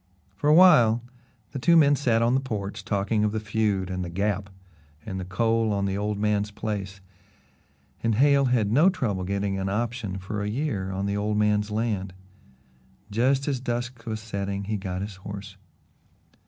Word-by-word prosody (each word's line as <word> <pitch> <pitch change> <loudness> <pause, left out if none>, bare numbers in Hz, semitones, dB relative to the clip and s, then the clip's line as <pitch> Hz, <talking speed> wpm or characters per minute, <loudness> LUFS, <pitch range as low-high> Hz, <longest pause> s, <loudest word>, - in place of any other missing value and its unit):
For 145 - -2
a - - +7
while 120 -11 +6 0.5
the 135 - -5
two 170 +6 +5
men 145 -2 +6
sat 120 -5 +1
on 120 +1 +2
the 135 - +3
porch 105 -5 -5
talking 105 +2 0
of 105 - +1
the 110 - -1
feud 100 -3 -1
and 90 0 -3
the 90 - -5
Gap 100 +2 -1 0.6
and 95 -3 -4
the 90 - -5
coal 115 +3 +1
on 100 -1 0
the 95 0 -1
old 105 +1 -2
man's 105 0 0
place, 100 -2 -5 1.0
and 115 -2 +1
Hale 140 +3 +4
had 120 -5 +1
no 155 +10 +5
trouble 110 - -2
getting 100 +1 -2
an 95 0 -2
option 110 -2 -2
for 105 +2 -5
a 105 - -2
year 105 -6 -2
on 95 +1 -2
the 100 0 -1
old 105 +1 -1
man's 105 0 +2
land. 105 -4 -2 1.0
Just 130 +5 +1
as 135 -3 0
dusk 120 -1 -4
was 110 -1 -3
setting 100 -2 -4
he 105 +2 -2
got 95 -2 -4
his 100 -1 -7
horse. 100 +1 -8
105 Hz, 180 wpm, -26 LUFS, 100-120 Hz, 1.0 s, a